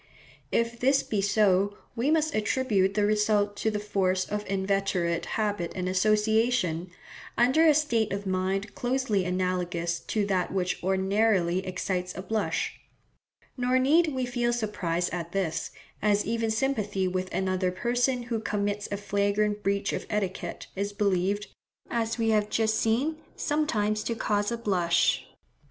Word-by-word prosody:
If 230 0 0
this 270 +2 +3
be 210 -2 -1
so, 200 0 +2 0.2
we 245 +4 0
must 315 -1 +2
attribute 210 -3 +1
the 210 -1 +3
result 210 -1 +2
to 220 - 0
the 210 - -2
force 190 -3 0
of 210 0 -3
inveterate 190 -3 0
habit 205 -6 -1
and 185 -1 -2
association, 210 -2 +2 0.5
under 260 +7 +5
a 305 - +6
state 235 -8 +1
of 200 +1 -3
mind 190 +2 -1
closely 245 -6 0
analogous 180 -2 -1
to 210 -2 -1
that 190 -3 0
which 185 -2 -1
ordinarily 190 -1 +2
excites 185 0 -3
a 185 - -5
blush; 215 +2 -2 0.8
nor 250 0 +1
need 305 +6 +4
we 260 -4 -1
feel 240 -1 0
surprise 195 -7 -1
at 170 -1 -5
this, 185 -5 -1 0.3
as 210 0 +2
even 225 0 -1
sympathy 215 -5 0
with 185 0 -2
another 185 -1 0
person 245 +5 0
who 235 -2 -2
commits 205 -1 -2
a 200 - -1
flagrant 205 +1 0
breach 200 0 0
of - - -4
etiquette 200 -3 -3
is 200 +1 -2
believed, 200 0 0 0.5
as 225 -1 -1
we 225 -1 +1
have 210 -1 +2
just 220 -1 +1
seen, 245 +9 +1 0.2
sometimes 215 -9 0
to 230 - -1
cause 205 -1 0
a 235 - -1
blush. 180 -7 +1
205 Hz, 145 wpm, -27 LUFS, 190-230 Hz, 0.8 s, a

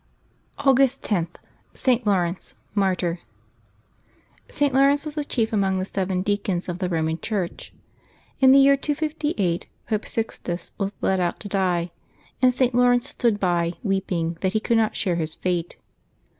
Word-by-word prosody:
August 270 -1 +3
10.— 175 -6 0 0.5
ST. 250 -3 +1
LAURENCE, 180 -3 0 0.2
Martyr. 185 -4 0 1.3
[t. 290 -1 +1
Laurence 275 +2 +3
was 305 - -5
the 300 -1 -2
chief 230 -5 -1
among 195 -2 +1
the 185 - -1
seven 190 -1 -2
deacons 200 -3 -1
of 175 0 -4
the 185 -2 -1
Eoman 160 -1 -1
Church. 195 -6 -3 0.7
In 265 -1 +7
the 270 - +8
year 275 0 +6
258 295 - -1 0.2
Pope 215 -1 -2
Sixtus 180 -6 -4
was 195 -1 -1
led 190 -1 +1
out 175 -1 -1
to 210 - -6
die, 180 -3 0 0.5
and 255 -1 +6
St. 250 0 +1
Laurence 245 +1 +3
stood 230 -4 0
by, 175 -2 +1
weeping 180 -5 -1
that 190 0 0
he 215 - +2
could 230 +2 +1
not 220 -1 +1
share 180 -4 0
his 160 -1 -3
fate. 175 -2 -2
200 Hz, 155 wpm, -23 LUFS, 180-250 Hz, 1.3 s, the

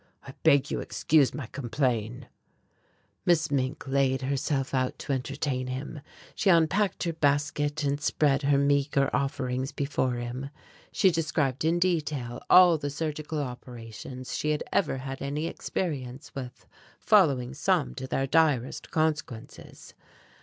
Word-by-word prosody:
I - - -9
beg 140 0 +4
you - - -1
excuse 150 -4 +2
my 145 - -6
complain." 120 -1 -2 1.0
Miss 160 -3 +2
Mink 135 +1 -1
laid 135 -1 +1
herself 135 0 -1
out 130 -1 0
to 140 - -3
entertain 130 0 -2
him. 135 +3 -5 0.3
She 200 - +1
unpacked 185 +4 +3
her 170 -2 -1
basket, 145 0 0
and 145 +1 0
spread 145 -2 +2
her 140 -1 +3
meagre 140 0 +2
offerings 130 -1 -2
before 135 -3 -1
him. 120 +3 -5 0.4
She 190 -3 +4
described 150 -5 -1
in 165 +2 +2
detail 150 -9 -1
all 180 -3 +7
the 145 - -3
surgical 155 +1 -4
operations 125 0 -8
she 150 - -1
had 150 -1 0
ever 185 - +1
had 135 +1 -6
any 145 +3 -2
experience 140 -6 -4
with, 130 -2 -8 0.3
following 140 - +3
some 165 +1 +1
to 130 -1 -6
their 135 +1 0
direst 140 -4 +1
consequences. 155 -7 -3
140 Hz, 135 wpm, -27 LUFS, 130-155 Hz, 1.0 s, all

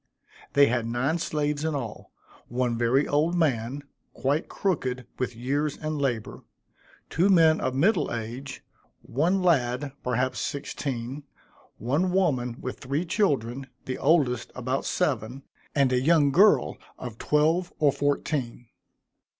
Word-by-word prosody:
They 140 0 +7
had 120 -3 0
nine 130 +8 0
slaves 150 -2 -1
in 160 -1 -1
all, 120 -6 -6 0.4
one 120 0 -1
very 120 +5 +2
old 155 +4 +1
man, 140 -4 0 0.3
quite 140 +6 0
crooked 130 -10 -2
with 125 -2 -2
years 140 +5 -1
and 155 -1 -3
labor 120 -6 -2 0.7
two 180 +5 +3
men 165 -4 +5
of 130 - -1
middle 175 +7 +2
age 120 +4 -6 0.4
one 175 +9 +1
lad, 135 -5 +1
perhaps 125 +1 0
sixteen 140 -2 -4 0.6
one 145 - 0
woman 130 -11 +1
with 130 - -6
three 140 +7 -2
children, 135 - 0 0.2
the 130 - -4
oldest 135 -6 +2
about 130 +2 -2
seven, 135 -5 -1 0.3
and 135 -3 +3
a 125 - +2
young 150 -1 +4
girl 170 - +4 0.2
of 120 -3 -8
twelve 160 +4 +2
or 145 -2 +4
fourteen. 135 -4 -2
140 Hz, 130 wpm, -26 LUFS, 125-155 Hz, 0.7 s, They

